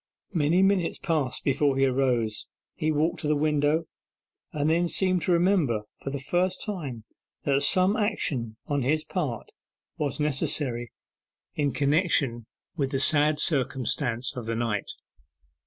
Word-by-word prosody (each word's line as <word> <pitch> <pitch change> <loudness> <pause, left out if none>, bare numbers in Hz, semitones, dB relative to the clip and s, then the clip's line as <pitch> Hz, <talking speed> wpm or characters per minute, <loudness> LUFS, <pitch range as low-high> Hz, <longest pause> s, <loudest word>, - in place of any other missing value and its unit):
Many 165 +2 +3
minutes 195 -3 +2
passed 150 -6 -1
before 140 0 +1
he 135 - +4
arose. 125 -5 0 0.3
He 155 - 0
walked 155 +2 0
to 155 - -3
the 150 - +2
window, 150 +2 +1 0.7
and 145 0 -1
then 170 +2 +2
seemed 185 0 +2
to 180 - +1
remember 170 - +2 0.2
for - - -4
the 140 - -3
first 180 +7 -1
time 145 - -5 0.4
that 140 -1 +2
some 185 +7 +4
action 140 - -1
on 145 -1 -1
his 155 +5 +1
part 150 - -4 0.5
was 145 -1 -2
necessary 135 -5 -1 0.6
in 145 -2 0
connection 140 - +1 0.3
with 140 -5 -1
the 135 -1 -1
sad 150 +1 +4
circumstance 130 -3 +1
of 120 -3 -6
the 115 - -1
night. 115 -3 -2
145 Hz, 140 wpm, -26 LUFS, 130-165 Hz, 0.7 s, he